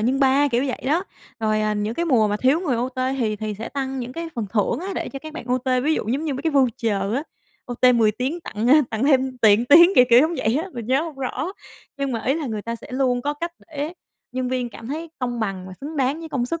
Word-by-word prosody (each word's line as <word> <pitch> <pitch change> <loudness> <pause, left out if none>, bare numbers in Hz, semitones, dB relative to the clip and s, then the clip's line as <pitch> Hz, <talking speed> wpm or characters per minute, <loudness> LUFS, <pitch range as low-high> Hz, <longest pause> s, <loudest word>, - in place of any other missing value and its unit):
nhân 255 +5 +1
3, 275 +2 +4
kiểu 245 +2 +1
vậy 255 - -4
đó. 325 +7 +1 0.4
Rồi, 215 -1 +1
à, 215 0 +1
những 210 +2 -2
cái 340 - -1
mùa 240 -10 +3
mà 205 - 0
thiếu 265 +9 +2
người 285 -10 0
OT 250 +2 -3 0.2
thì 215 -4 0
thì 215 0 -4
sẽ 225 - -5
tăng 270 -1 -3
những 250 0 -5
cái 335 +3 -5
phần 225 -4 -3
thưởng 225 +3 +1
á 365 - -5
để - - -3
cho 275 - -7
các 310 +2 -9
bạn 315 - -7
OT, 255 +1 -1 0.2
ví 315 +2 +3
dụ - - -3
giống 275 +7 -1
như 290 - -1
mấy 270 - -5
cái 325 - +1
voucher 225 -7 +1
á, 275 - 0 0.4
OT 250 +1 +3
10 225 -2 +4
tiếng 260 +10 -3
tặng 220 -8 -4 0.2
tặng 220 +3 -1
thêm 265 -2 +2
tiền 220 0 +5
tiếng, 340 +4 +9
kiểu 250 - +7
kiểu 235 - +8
giống 320 +4 +1
vậy 245 -1 +1
á, 380 - -7
mình 235 -3 -6
nhớ 265 +4 +2
hông 325 -2 -6
rõ. 270 +6 -3 0.4
Nhưng 275 -2 -2
mà 225 -2 -3
ý 265 - +2
là 315 -2 -3
người 215 -4 -4
ta 230 +2 -4
sẽ - - -12
luôn 255 -2 +1
có 290 +2 -1
cách 335 +3 -4 0.2
để 300 +1 -4 0.4
nhân 255 0 -2
viên 250 -1 -1
cảm 225 - -10
thấy 315 +5 -5
công 245 -2 -3
bằng 195 -4 -3
và 190 - -9
xứng 300 +3 -6
đáng 275 +3 0
với 325 - -7
công 255 -5 -1
sức. 335 +6 -3
255 Hz, 275 wpm, -22 LUFS, 230-290 Hz, 0.4 s, tiếng